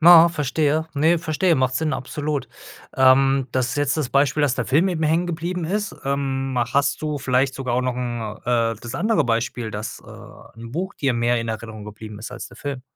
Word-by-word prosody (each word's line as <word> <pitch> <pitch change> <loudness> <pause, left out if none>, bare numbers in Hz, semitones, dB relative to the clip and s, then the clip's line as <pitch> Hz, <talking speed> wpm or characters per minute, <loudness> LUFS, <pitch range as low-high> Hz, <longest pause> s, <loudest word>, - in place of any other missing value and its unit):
na 170 0 +9
verstehe. 155 0 0
Ne, 160 +4 +3
verstehe, 165 +2 +1
macht 130 -2 +1
Sinn, 155 +3 0
absolut. 145 +2 -3 0.5
Ähm. 135 0 +5
Das 130 -1 +1
ist 140 - -3
jetzt 145 0 +1
das 150 -5 -1
Beispiel, 140 +1 +2
dass 140 -4 +2
der - - -2
Film 155 +8 +3
eben 170 -3 -2
hängen 160 +3 +2
geblieben 175 +1 -3
ist. 205 +4 -2
Ähm, 135 -1 -1 0.2
hast 140 0 +2
du 150 -1 -2
vielleicht 130 0 +1
sogar 130 -3 -2
auch 125 - +2
noch 125 -1 -1
'n 120 -4 -4
äh, 115 -2 +1
das 120 +1 -7
andere 200 +1 +2
Beispiel, 115 -1 -1
dass, 105 +1 -6
äh, - - -14
'n 115 0 -8
Buch 190 +6 -3
dir 135 -3 0
mehr 120 0 +1
in 115 - -5
Erinnerung 110 -1 -6
geblieben 105 0 -9
ist 110 - -7
als - - -7
der - - -15
Film? 140 -3 -5
135 Hz, 210 wpm, -22 LUFS, 120-155 Hz, 0.5 s, na